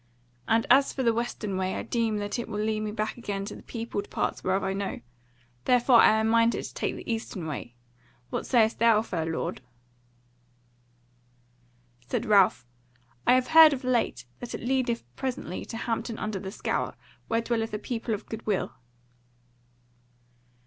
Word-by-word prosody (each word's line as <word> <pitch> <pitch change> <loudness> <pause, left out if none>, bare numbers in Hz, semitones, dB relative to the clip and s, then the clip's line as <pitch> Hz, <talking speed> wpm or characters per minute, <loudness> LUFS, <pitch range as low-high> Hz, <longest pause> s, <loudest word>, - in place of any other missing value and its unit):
And 225 0 +3
as 275 +2 +6
for 265 - -3
the 230 -2 +3
western 225 -4 -3
way 185 0 -1
I - - -3
deem 230 -2 0
that 205 0 -4
that 240 +1 -3
will 210 -1 -3
lead 215 0 0
me 215 0 -3
back 215 +2 -3
again 200 -4 -3
to - - -7
the - - -11
peopled 225 -3 -5
parts - - -2
whereof 190 +1 +1
I 190 0 -1
know; 195 0 -3 0.7
therefore 250 0 +5
I 220 - +6
am 220 - +1
minded 230 +1 +3
to - - -8
take - - -2
the - - -10
eastern 225 -6 -3
way. 120 -6 -6 0.6
What - - -3
sayest 225 -3 +3
thou, 225 -1 +5
fair 165 -7 -3
lord?" 165 -4 -3 2.5
Said - - -1
Ralph: 195 - +4 0.6
"I - - +7
have 255 0 +1
heard 320 -1 +9
of 265 -1 -5
late 250 - 0
that 245 - -6
it - - -7
leadeth 255 -3 0
presently 260 -8 -4
to 225 - -6
Hampton 230 0 -3
under 215 -2 -3
the 190 0 -6
Scaur, 195 - -2 0.3
where 230 0 +1
dwelleth 225 -1 -1
a 210 - -2
people 225 0 -3
of 205 - -9
goodwill." 215 -3 -2
225 Hz, 170 wpm, -27 LUFS, 205-235 Hz, 2.5 s, heard